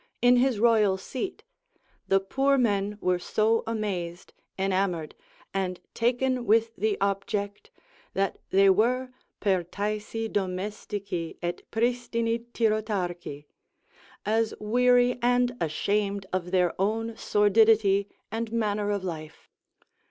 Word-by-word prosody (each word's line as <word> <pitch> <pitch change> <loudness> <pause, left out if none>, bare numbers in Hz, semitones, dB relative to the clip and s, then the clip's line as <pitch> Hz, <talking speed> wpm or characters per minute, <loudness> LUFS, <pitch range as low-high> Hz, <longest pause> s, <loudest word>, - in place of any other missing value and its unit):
in 245 +1 +5
his 250 -3 +2
royal 215 -4 +4
seat, 260 - -5 0.6
the 195 - +4
poor 270 +8 +1
men 205 -4 +1
were 180 -1 +1
so 220 +5 +1
amazed, 190 -6 -4 0.2
enamoured, 190 -4 0 0.4
and 185 -2 -2
taken 250 +2 +1
with 225 +1 +3
the 210 +1 0
object, 200 +1 -2 0.5
that 195 0 0
they 195 +1 +5
were 240 +7 +3 0.3
pertaesi 210 +4 -1
domestici 195 -2 -3
et 175 0 -2
pristini 235 0 0
tyrotarchi, 195 -10 -1 0.8
as 220 +1 +1
weary 245 +3 +3
and 245 0 +2
ashamed 200 +5 0
of 180 -1 -1
their 180 -2 +2
own 225 +3 -1
sordidity 205 -1 +4 0.2
and 225 +1 -3
manner 210 -2 0
of 200 -2 -1
life. 155 -4 -7
210 Hz, 105 wpm, -27 LUFS, 190-230 Hz, 0.8 s, in